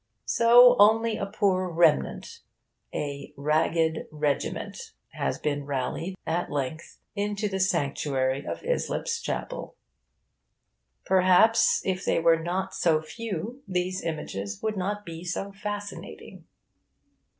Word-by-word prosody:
So 245 +1 +7
only 220 +2 +5
a 200 - -3
poor 185 -2 +1
remnant, 165 - +1 0.5
a 140 0 -5
'ragged 160 +2 +1
regiment,' 150 -2 -3 0.2
has - - -2
been 145 -1 -2
rallied, 145 +7 -3
at 170 +2 -1
length, 145 +3 -4 0.2
into 205 +1 -1
the 190 -1 -3
sanctuary 140 -6 0
of - - -6
Islip's 480 -1 -1
Chapel. - - -5 1.3
Perhaps, 190 +4 +4
if 190 0 -1
they - - +1
were 165 0 +4
not 180 +3 -2
so 160 -3 +2
few, 210 - -6
these 185 0 -2
images 100 -11 -4
would 220 -1 -1
not 205 +2 -3
be 165 -1 -8
so 190 +3 -4
fascinating. 205 +1 -7
180 Hz, 115 wpm, -27 LUFS, 155-205 Hz, 1.3 s, So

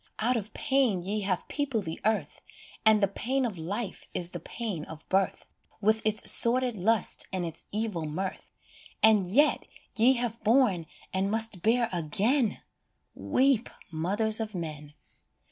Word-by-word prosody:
s - - -31 0.2
Out 250 +2 +2
of 215 -2 -4
pain 260 -10 +1
ye 205 +4 -2
have 190 -3 -2
peopled 270 -8 -2
the 160 - -6
earth, 210 -9 -1 0.4
And 215 -1 +5
the - - +5
pain 255 +7 -1
of 205 -8 -4
life 200 +5 -5
is 175 0 -1
the 175 - -6
pain 200 -2 -5
of 160 -1 -11
birth, 190 0 0 0.3
With 220 +1 +1
its 215 0 +2
sordid 245 0 +3
lust 215 +2 +2
and 185 -2 -2
its 165 - -6
evil 210 -6 -2
mirth, 185 +5 -5 0.6
And 215 -4 +5
yet 280 +11 +3 0.3
ye 235 +4 +5
have 240 -2 -2
borne 215 -8 +3 0.3
and 190 +1 0
must 220 -3 +1
bear 235 +3 +2
again 205 - +1 0.6
Weep, 260 -3 +1 0.2
mothers 205 +7 +1
of 215 -2 -4
men 150 -3 -6
215 Hz, 155 wpm, -28 LUFS, 180-235 Hz, 0.6 s, And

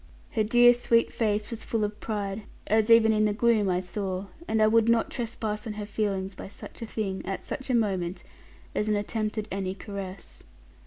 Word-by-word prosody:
Her 220 - +1
dear 240 +2 +7
sweet 235 -1 +2
face 210 -1 0
was 230 -1 -5
full 225 -2 -1
of 210 0 -3
pride, 205 -1 -3 0.2
as 220 +1 +2
even 225 -1 +7
in 215 0 +3
the 210 - +2
gloom 220 -3 +3
I 180 0 +1
saw: 190 0 -3 0.2
and 220 - +1
I 215 - +6
would 225 +1 +4
not 230 -1 +3
trespass 220 -3 -3
on 215 - -3
her 210 0 -5
feelings 200 -2 -2
by 185 - -8
such 200 - -11
a 230 - -4
thing, 200 -4 -3
at 195 +1 -4
such 265 - -6
a 255 - +3
moment, 190 -5 0 0.5
as 210 - 0
an 210 - +3
attempt 215 +1 -2
at 215 0 -2
any 190 0 -2
caress. 195 -2 -8
215 Hz, 205 wpm, -27 LUFS, 195-225 Hz, 0.5 s, dear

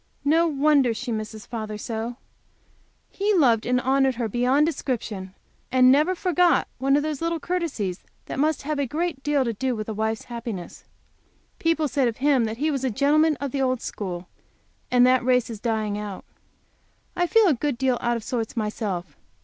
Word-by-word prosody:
No 325 +4 +4
wonder 280 -5 +3
she 250 +1 -4
misses 215 -1 -5
father 215 -2 -5
so! 225 +2 -4 1.0
He 410 +1 +1
loved 240 -9 +3
and 250 0 +2
honored 265 0 +2
her 235 -1 -2
beyond 250 +7 +2
description, 225 - -3 0.4
and 255 0 +6
never 305 +7 +3
forgot 360 -1 +2
one 275 +2 +3
of 290 - +2
those 305 -2 -3
little 335 0 -1
courtesies 290 - -3 0.2
which - - -6
must 305 0 +1
have 300 0 -2
a 280 - 0
great 315 +1 -2
deal 290 -2 +1
to 230 - -1
do 255 +3 -1
with 215 -1 -5
a 220 - -3
wife's 220 +1 -2
happiness. 230 -7 -7 0.7
People 325 -2 +1
said 265 -1 +1
of 230 - -3
him 270 -3 +3
that 220 0 -4
he 305 +4 0
was 270 -2 -2
a 260 - +1
gentleman 295 +6 +3
of 280 -2 -3
the 275 - -1
old 255 -1 +1
school, 180 -5 -5 0.6
and 245 0 +5
that 255 0 +4
race 250 -1 +2
is 220 - -7
dying 215 -2 -1
out. 205 -2 -7 0.9
I 355 0 +1
feel 450 +4 +5
a 345 - +5
good 280 0 -2
deal 255 -1 +1
out 240 -1 +1
of 225 - -8
sorts 230 0 -3
myself. 205 - -3
255 Hz, 190 wpm, -24 LUFS, 225-295 Hz, 1.0 s, and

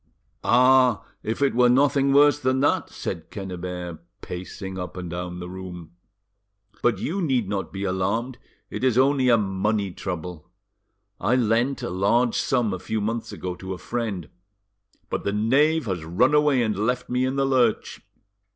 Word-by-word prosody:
"Ah! 125 -3 +4 0.2
if 115 +6 -2
it 140 - +2
were 125 0 +4
nothing 140 +1 +3
worse 145 +1 +5
than 130 -1 +1
that!" 145 - +1
said 80 -1 -6
Quennebert, 90 -3 -6 0.2
pacing 95 +1 -7
up 90 -1 -6
and 90 -2 -6
down 90 0 -5
the 90 0 -6
room: 90 -2 -8 0.9
"but 120 - +2
you 190 +5 -2
need 130 - +1
not 100 -1 -3
be 95 0 -5
alarmed; 100 +7 -1 0.3
it 105 - -5
is 130 -3 +2
only 135 -1 +3
a 120 - +6
money 100 0 -1
trouble. 90 -3 -6 0.7
I 110 +7 +2
lent 120 +3 +1
a - - -3
large 115 +6 +2
sum, 120 -6 +1
a 95 - -4
few 110 +4 -3
months 110 +2 -3
ago, 90 -1 -5
to 95 0 -5
a - - -10
friend, 105 -8 -4 0.8
but - - -2
the 100 - -1
knave 140 +9 +2
has 95 -6 -3
run 100 - +2
away 150 -4 +4
and 110 -2 0
left 125 +5 -1
me 125 +1 0
in 130 +1 0
the 135 0 +1
lurch. 125 -5 +1
110 Hz, 170 wpm, -24 LUFS, 95-130 Hz, 0.9 s, a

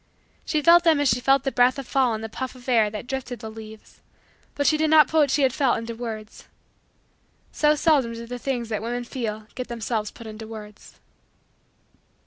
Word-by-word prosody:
She 305 -2 -1
felt 345 +2 +7
them 325 -4 +4
as 290 -2 +2
she 230 - +2
felt 270 +1 +3
the 270 - -1
breath 250 +2 +3
of 275 - -5
fall 255 -4 +2
in 215 - -6
the 225 - -4
puff 260 +4 -6
of 250 0 -15
air 225 -4 +3
that 210 +2 -7
drifted 255 -1 -5
the 220 -1 -8
leaves: 220 -1 -12 0.5
but 285 - -1
she 310 - +4
did 310 0 +1
not 305 -3 +7
put 320 - +1
what 290 -2 +4
she 275 0 +3
felt 260 -1 +1
into 230 0 -5
words. 225 -2 -8 1.0
So 300 0 +3
seldom 290 -7 +2
do 230 0 -7
the 245 +1 -7
things 240 -3 -3
that 215 -2 -2
women 240 +2 -3
feel 220 -4 -5
get 255 - -5
themselves 225 -2 -3
put 230 - -13
into 220 0 -8
words. 210 -2 -11
245 Hz, 205 wpm, -24 LUFS, 225-275 Hz, 1.0 s, felt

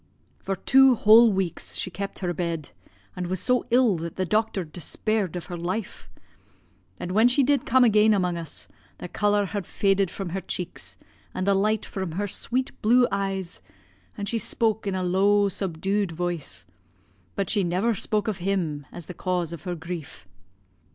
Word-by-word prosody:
"For 195 - -3
two 265 +6 +5
whole 225 +1 +7
weeks 190 -4 -2
she 185 - -4
kept 195 +2 -5
her 175 - 0
bed, 165 -3 -3 0.4
and 180 -1 -3
was 185 0 -2
so 250 +6 +1
ill 240 -6 +4
that 165 0 -6
the 185 - -1
doctor 215 0 0
despaired 185 +4 -2
of 175 - -5
her 175 - -6
life; 185 +5 -4 0.9
and 180 - -4
when 220 +5 +5
she 250 +3 +3
did 280 -1 +1
come 260 +1 +5
again 215 -2 +5
among 180 -4 +1
us, 140 - -6 0.3
the - - -7
colour 205 +2 +1
had 200 0 -3
faded 195 -2 +1
from 195 0 -5
her 190 +3 -3
cheeks, 180 -1 -5 0.4
and 185 - -1
the 200 - +4
light 210 +2 +1
from 190 -4 -5
her 205 +4 -2
sweet 255 +6 -1
blue 245 +3 +5
eyes, 195 -2 -3 0.6
and 200 - -4
she 230 +2 0
spoke 220 0 0
in 195 - -1
a 185 - -1
low 200 +3 +3
subdued 195 +1 -1
voice, 160 - -3 0.7
but 195 - -1
she 205 -3 +1
never 185 +7 +1
spoke 215 +1 -1
of 205 -4 -2
him 170 -7 -2
as 175 - -8
the 180 - -8
cause 175 -2 -2
of 170 +2 -9
her 180 -1 -2
grief. 160 - -8
195 Hz, 180 wpm, -25 LUFS, 175-215 Hz, 0.9 s, whole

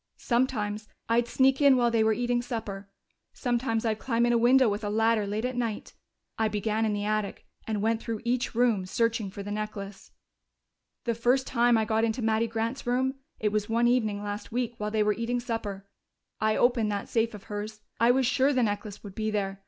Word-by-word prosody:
Sometimes 220 -4 -1 0.2
I'd 235 +1 +2
sneak 265 +3 +3
in 280 -2 +6
while 240 -1 +3
they 225 -1 +3
were 220 - +3
eating 240 +2 0
supper; 210 -5 -5 0.4
sometimes 240 -2 -1
I'd 220 -1 0
climb 235 -2 +1
in 240 - +2
a - - +4
window 255 +2 +5
with 210 +1 -1
a 205 - -1
ladder 220 0 +2
late 210 +3 -2
at 255 0 -2
night. 230 -4 -3 0.5
I 220 - +3
began 215 +1 0
in 215 - 0
the 205 0 -2
attic 215 -1 -2 0.2
and 210 -2 -1
went 225 0 +1
through 225 -3 -4
each 245 -1 -1
room, 225 -6 +2
searching 230 0 0
for 200 +1 -7
the 205 - -6
necklace. 205 -2 -6 0.9
"The 235 - 0
first 245 +3 +2
time 240 -1 +3
I 220 - +1
got 220 +1 +1
into 230 +1 0
Mattie 220 +1 +2
Grant's 230 +3 -3
room 260 +2 +1 0.3
it 210 -1 0
was 210 0 -1
one 235 +1 +3
evening 215 -4 +1
last 205 +2 -5
week, 240 0 -1
while 210 0 -2
they 215 0 +1
were 210 0 +2
eating 230 +3 -2
supper 220 -5 -4 0.5
I 215 0 +2
opened 240 -4 +2
that 200 -1 -3
safe 225 -1 0
of 205 - -11
hers. 210 +1 -6 0.2
I 230 +2 +4
was 260 +1 +4
sure 265 +3 +3
the 255 -2 +2
necklace 205 -1 -3
would 200 -2 -9
be 215 +2 -2
there. 195 -2 -2
225 Hz, 210 wpm, -28 LUFS, 210-240 Hz, 0.9 s, in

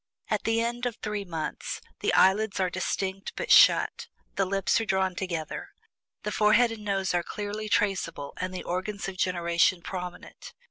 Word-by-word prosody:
At - - 0
the 225 0 +2
end 240 +1 -1
of 235 - -4
THREE 210 -2 -4
MONTHS, 165 -4 -4 0.2
the - - +1
eyelids 200 +2 +4
are 185 -1 +1
distinct 190 +2 -3
but - - -3
shut; - - +6 0.3
the 195 -1 +1
lips 195 +3 +1
are - - -2
drawn 190 -2 +1
together; 170 -4 -4 0.5
the 210 - -2
forehead 215 +3 +4
and 220 -2 -7
nose 195 -2 0
are 175 - +2
clearly 210 +4 -5
traceable, 180 -9 0
and 185 0 -3
the 185 - -5
organs 195 +3 -3
of 190 -1 -6
generation 175 -1 +2
prominent. 180 -2 -7
195 Hz, 170 wpm, -27 LUFS, 180-210 Hz, 0.5 s, shut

